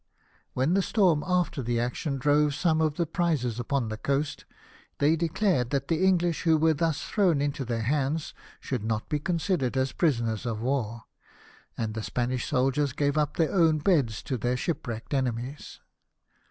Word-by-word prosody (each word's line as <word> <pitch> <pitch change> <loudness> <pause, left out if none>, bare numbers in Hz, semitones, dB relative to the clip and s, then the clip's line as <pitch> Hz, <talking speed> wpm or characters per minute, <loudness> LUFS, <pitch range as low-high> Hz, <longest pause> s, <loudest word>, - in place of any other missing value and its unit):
When 135 +7 +1
the 195 - +3
storm 180 -7 +2
after 180 -5 0
the 120 -1 -1
action 130 +4 -2
drove 145 +2 +2
some 160 -1 +2
of 155 -2 +1
the 170 - 0
prizes 155 -8 -1
upon 120 -1 -1
the 110 - -4
coast, 140 +4 -2 0.5
they 150 +3 +3
declared 170 - +1
that 140 0 -2
the 165 +2 +1
English 175 -3 +2
who 165 -2 +4
were 160 +1 +3
thus 160 0 -1
thrown 180 -8 +2
into 140 -1 -1
their 115 -2 -2
hands 145 +4 -1 0.3
should 125 -6 -3
not 110 0 -2
be 150 - 0
considered 165 -5 -1
as 130 0 +1
prisoners 115 - 0
of 110 -2 -2
war, 115 -2 -2 0.7
and 110 -1 -2
the 110 - -4
Spanish 125 +2 -2
soldiers 135 +1 +1
gave 145 0 0
up 150 -1 0
their 160 -2 +1
own 165 -4 +4
beds 145 - +1
to 130 - -2
their 125 +2 0
shipwrecked 125 -7 -4
enemies. 130 +1 -3
145 Hz, 170 wpm, -27 LUFS, 125-160 Hz, 0.7 s, who